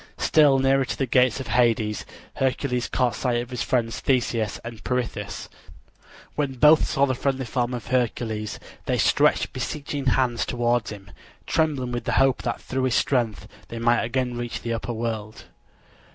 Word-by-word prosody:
Still 145 -3 +4
nearer 135 0 +3
to 130 - -4
the 135 - 0
gates 125 0 +3
of 135 - -6
Hades 115 -3 +1 0.3
Hercules 130 -2 0
caught 125 -2 +1
sight 120 -2 0
of 120 +1 -6
his 125 - -3
friends 115 -3 0
Theseus 120 -5 0
and 115 -2 -8
Pirithous. 125 -1 -3 0.9
When 145 -3 -1
both 150 +5 +6
saw 140 - +2
the 130 - 0
friendly 135 +1 -1
form 125 +1 -1
of 120 - -7
Hercules 115 -4 -1 0.3
they - - +1
stretched - - +3
beseeching 145 -2 -4
hands 125 -2 +2
towards 120 -2 0
him, 100 -1 -10 0.3
trembling 145 -6 0
with 120 -1 -4
the - - -1
hope 135 0 +3
that 120 - -2
through 130 0 -2
his 125 - +1
strength 120 -6 0 0.2
they 115 - -7
might 120 +1 +3
again 125 +1 -1
reach 120 -1 -4
the 115 0 -2
upper 115 +2 -3
world. 110 -2 -4
125 Hz, 165 wpm, -24 LUFS, 115-135 Hz, 0.9 s, both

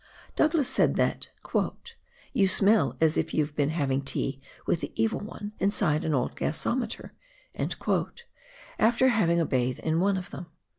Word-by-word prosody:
Douglas 310 -3 +2
said - - +2
that - - 0 0.5
" 480 +1 -20
you 195 - +4
smell 190 - +3
as 160 -1 +3
if 160 0 -1
you've 150 -1 0
been 145 -1 +1
having 140 -4 0
tea 135 0 -2 0.2
with 170 - +1
the - - -4
Evil 225 -1 +1
One 205 0 -7
inside 175 -6 +1
an 155 - +1
old 125 - -1
gasometer," 230 +8 -2 1.7
after 235 +4 +4
having 170 -8 +2
a 165 - +2
bathe 125 -2 0
in 160 +1 0
one 195 +1 +2
of 180 - -6
them. 175 - -7
170 Hz, 155 wpm, -27 LUFS, 150-220 Hz, 1.7 s, you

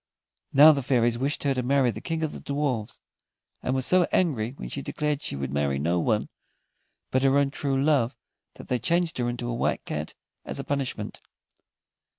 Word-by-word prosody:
Now, 150 +3 +9
the 140 -2 0
fairies 120 -2 +1
wished 140 +3 -1
her 140 -1 +2
to 130 - -1
marry 130 0 +2
the 110 0 -8
King 160 +3 -2
of 155 - -1
the - - -9
Dwarfs, 140 -7 -2 0.6
and 130 - -1
were 130 - 0
so 180 +4 +4
angry 130 -10 +1
when 135 - -8
she - - -4
declared 150 -1 -2
she - - -4
would 70 -1 -4
marry 70 -1 0
no 85 +5 +1
one 105 +5 +1 0.8
but 130 - +2
her 135 +1 +4
own 140 -1 +2
true 140 -2 -1
love, 135 -4 +2 0.4
that - - -11
they 125 - 0
changed 170 +4 0
her 120 0 0
into 120 0 -4
a 120 - -2
White 115 - -1
Cat 75 +1 -4 0.3
as - - -6
a - - -4
punishment. 140 -2 -3
130 Hz, 195 wpm, -26 LUFS, 115-145 Hz, 0.8 s, Now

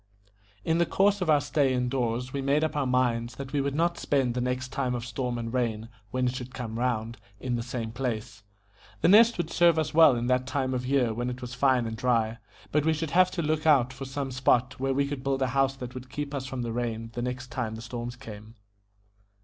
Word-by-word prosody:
In 165 +1 +2
the 170 - +4
course 200 0 +2
of 180 - -1
our 150 -2 +6
stay 145 -1 +1
in 125 -1 0
doors 125 0 -2
we 140 - -2
made 140 +3 +2
up 155 - -1
our 145 -3 0
minds 120 -2 +1
that 135 +3 -8
we 145 - +2
would 140 0 -2
not 170 +2 +1
spend 135 -4 +1
the 125 - -2
next 125 +1 -2
time 130 -2 -1
of 120 -1 -4
storm 125 +1 -3
and 115 0 -4
rain, 115 -3 -1 0.2
when 130 +3 -1
it 125 +1 0
should 130 0 -7
come 115 -3 -5
round, 115 -2 -1 0.2
in 125 +2 -2
the 120 - -1
same 115 -2 -4
place. 115 -3 -4 0.6
The - - +4
Nest 225 +5 +7
would 170 -2 -2
serve 170 -2 +4
us 160 - -1
well 160 -4 +7
in 120 0 -2
that 130 +1 +1
time 130 -1 -1
of 125 0 -2
year 130 -4 +2
when 120 +2 -2
it 125 0 -5
was 125 -1 -7
fine 125 -1 +2
and 115 0 -4
dry, 115 -1 0 0.3
but 150 -1 +2
we 160 +1 +3
should 155 -1 -3
have 185 +1 +5
to 170 -2 -3
look 155 +1 0
out 130 -4 +4
for 130 +1 -7
some 135 0 -4
spot 130 0 +1
where 135 0 0
we 140 0 +1
could 140 -2 -5
build 135 0 0
a - - +1
house 135 +1 +1
that 125 -2 -7
would 130 0 -9
keep 145 +1 -5
us 135 -2 -3
from 130 -2 -4
the 115 - -3
rain 115 -1 -3
the 120 - -3
next 125 +1 -4
time 110 -2 -3
the 110 - -8
storms 120 0 -5
came. 110 -1 -11
130 Hz, 245 wpm, -27 LUFS, 120-140 Hz, 0.6 s, Nest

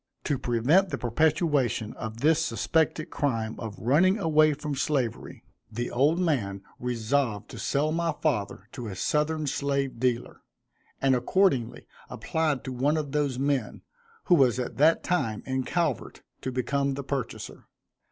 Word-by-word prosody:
To 145 -4 -1
prevent 135 +12 +3
the - - -2
perpetration 135 -2 +1
of 110 +1 -7
this 160 +2 +4
suspected 155 +5 0
crime 115 -6 -1
of 110 -3 -6
running 170 - +3
away 155 -5 +4
from 150 0 -4
slavery, 135 -4 -2 0.3
the 120 +2 -3
old 145 +7 +3
man 115 - -1 0.2
resolved 120 -2 -1
to - - -9
sell 150 +2 0
my 170 +1 0
father 105 -9 -1
to 120 -4 -6
a 100 - -6
southern 150 - 0
slave 140 -3 -1
dealer, 125 -1 -1 0.6
and 135 -1 +4
accordingly 130 - +1 0.2
applied 155 -4 -1
to 130 - -5
one 140 +5 +1
of 145 -3 -3
those 145 -3 0
men, 135 -4 -1 0.4
who 180 - +3
was 130 -7 +4
at 125 - -4
that 155 +4 +4
time 115 -12 -1
in 130 0 -1
Calvert, 165 - -2 0.2
to 130 - -3
become 135 +2 0
the 140 - -5
purchaser. 135 -3 -5
140 Hz, 150 wpm, -27 LUFS, 120-155 Hz, 0.6 s, this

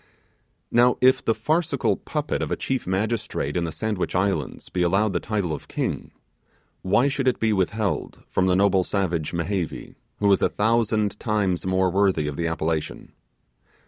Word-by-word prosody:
Now, 120 +1 +4
if 130 +1 +4
the 115 - +1
farcical 155 +9 +1
puppet - - -3
of - - -3
a - - +2
chief 130 -6 -3
magistrate 100 -6 -1
in 85 -1 0
the 80 - -3
Sandwich 95 +5 -2
Islands 95 -7 -1
be 90 - -2
allowed 95 +4 +2
the 90 - +1
title 100 -6 -2
of 75 - -7
King, - - -3 0.7
why 120 +8 +3
should 135 -2 -1
it 125 - +2
be 110 -1 +2
withheld 100 +2 -1
from 95 - +1
the 90 - +3
noble 95 -1 +3
savage 90 -6 -1
Mehevi, 85 0 -3 0.2
who 100 -1 +3
is 95 - +4
a - - +3
thousand 110 -1 +1
times 100 -5 0
more 95 0 +2
worthy 95 -5 +2
of 75 -1 -3
the 85 +2 -1
appellation? 80 -1 -3
95 Hz, 170 wpm, -24 LUFS, 90-110 Hz, 0.7 s, Now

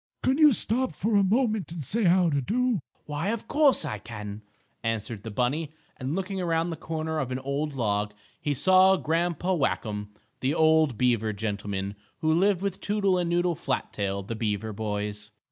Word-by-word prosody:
Can't 265 +3 +2
you 305 -2 +8
stop 250 +2 +2
for 220 +1 0
a 200 - +5
moment 215 -2 +1
and 165 -3 -5
say 215 - 0
how 180 0 +5
d' 140 -2 0
do?" 240 - +1 0.2
"Why, 150 +4 -3
of 230 +1 -2
course, 290 -3 +4
I 105 - -4
can," 105 -1 -7 0.4
answered 115 -1 -2
the 110 - -7
bunny, 140 +8 -1 0.2
and, 135 +4 -3
looking 190 0 -2
around 165 -1 0
the - - -3
corner 160 0 -3
of 135 -4 -2
an 130 - -2
old 140 +2 -3
log, 105 -3 -1 0.3
he 145 -1 0
saw 185 +5 +6
Grandpa 170 +4 0
Whackum, 105 - -1 0.3
the 135 +4 0
old 160 -6 +4
beaver 115 -4 +2
gentleman, 100 -2 -3 0.3
who 155 -1 +3
lived 190 +2 +2
with 195 -2 -2
Toodle 200 -3 +1
and 175 -1 -1
Noodle 175 0 +2
Flat 140 -4 -3
tail, 100 -1 -2
the 110 - -5
beaver 110 -1 -2
boys. 105 0 -4
155 Hz, 180 wpm, -27 LUFS, -, 0.4 s, you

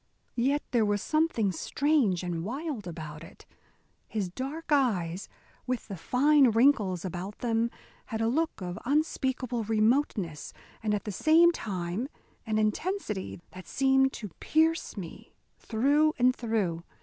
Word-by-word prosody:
Yet 280 +4 +2
there 235 -3 +3
was 205 -1 +1
something 310 -8 +1
strange 225 - +1
and 170 -2 -3
wild 260 - -4
about 160 -2 -7
it. - - -14 0.6
His 205 -4 -2
dark 280 - -6
eyes, 195 - +1 0.4
with 255 -2 -2
the 195 - -4
fine 275 - +4
wrinkles 215 - +3
about 185 +3 -5
them, 230 -1 0 0.4
had 220 -2 -4
a 225 - +1
look 315 +1 0
of 180 0 -5
unspeakable 260 -4 0
remoteness, 215 - 0 0.3
and 210 -1 +1
at 205 - -3
the 210 - -4
same 325 - +5
time 190 - -3 0.4
an 215 -1 0
intensity 215 - -2
that 185 0 -11
seemed 265 0 +3
to 210 -3 -6
pierce 320 -5 +1
me 175 -4 -9 0.2
through 285 +7 +2
and 255 +1 +4
through. 205 -8 -1
225 Hz, 135 wpm, -29 LUFS, 190-280 Hz, 0.6 s, same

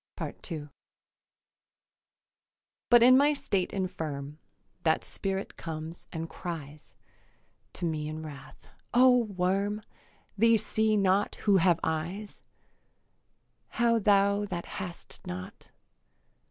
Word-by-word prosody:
II 155 -4 -6 2.2
But 240 -1 +7
in 255 +1 +8
my 285 +3 +5
state 195 -9 -1
infirm 155 -6 -4 0.4
That 160 -1 +2
Spirit 195 0 -3
comes 160 +1 -6
and 165 -1 -4
cries 155 -4 -8 0.8
To 175 - -3
me 155 -2 -2
in 155 +1 -5
wrath, 145 -3 -11 0.3
'O 255 0 +7
worm, 200 +2 -1 0.5
They 230 +2 +5
see 220 0 +1
not 195 0 +2
who 200 -2 +5
have 175 -2 +3
eyes, 170 +7 -3 1.4
How 235 -1 +3
thou 200 0 +3
that 175 -3 -4
hast 180 -2 -6
not? 90 +1 -7
185 Hz, 100 wpm, -29 LUFS, 160-210 Hz, 2.2 s, in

